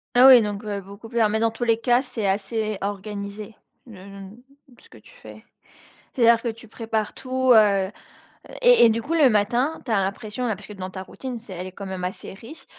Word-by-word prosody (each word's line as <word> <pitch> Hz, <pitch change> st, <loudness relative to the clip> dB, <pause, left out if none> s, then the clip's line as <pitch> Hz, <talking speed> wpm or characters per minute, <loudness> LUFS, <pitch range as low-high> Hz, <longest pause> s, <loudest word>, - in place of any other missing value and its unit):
Ah 250 Hz, +2 st, +8 dB
oui, 255 Hz, -3 st, +9 dB
donc, 205 Hz, 0 st, -4 dB
heu 205 Hz, -2 st, -4 dB
beaucoup 200 Hz, +4 st, -12 dB
plus 235 Hz, 0 st, -2 dB
ah 215 Hz, -, +5 dB
mais 220 Hz, +1 st, 0 dB
dans 230 Hz, -, +2 dB
tous 225 Hz, +2 st, -6 dB
les 230 Hz, -1 st, +2 dB
cas 245 Hz, +1 st, +2 dB
c'est 225 Hz, -6 st, -4 dB
assez 210 Hz, +2 st, -2 dB
organisé, 200 Hz, +1 st, -6 dB, 0.3 s
le 230 Hz, -, -12 dB
le, 200 Hz, 0 st, -11 dB
mmh 200 Hz, +5 st, -12 dB, 0.4 s
ce -, -, -20 dB
que -, -, -16 dB
tu -, -, -19 dB
fais? -, -, -14 dB, 0.7 s
C'est-à-dire 235 Hz, -2 st, +4 dB
que 240 Hz, -, -2 dB
tu 230 Hz, 0 st, -8 dB
prépares 220 Hz, -1 st, -3 dB
tout, 260 Hz, 0 st, +1 dB
heu 200 Hz, -4 st, +4 dB, 0.7 s
et -, -, +6 dB
et -, -, +6 dB
du 225 Hz, +1 st, -1 dB
coup 290 Hz, +9 st, -4 dB
le 295 Hz, -6 st, +5 dB
matin, 240 Hz, +8 st, 0 dB
tu 235 Hz, -, -2 dB
as 205 Hz, -, +3 dB
l'impression, 210 Hz, +5 st, -4 dB
là 215 Hz, -, -1 dB
parce 200 Hz, -, -12 dB
que -, -, -10 dB
dans 190 Hz, -2 st, -7 dB
ta 185 Hz, 0 st, -7 dB
routine, 255 Hz, +4 st, -7 dB
c'est 220 Hz, -3 st, -13 dB
elle 185 Hz, +1 st, -6 dB
est -, -, -12 dB
quand 200 Hz, +1 st, -9 dB
même 190 Hz, -1 st, -6 dB
assez 185 Hz, +1 st, -6 dB
riche, 230 Hz, +11 st, -12 dB
220 Hz, 235 wpm, -23 LUFS, 200-240 Hz, 0.7 s, oui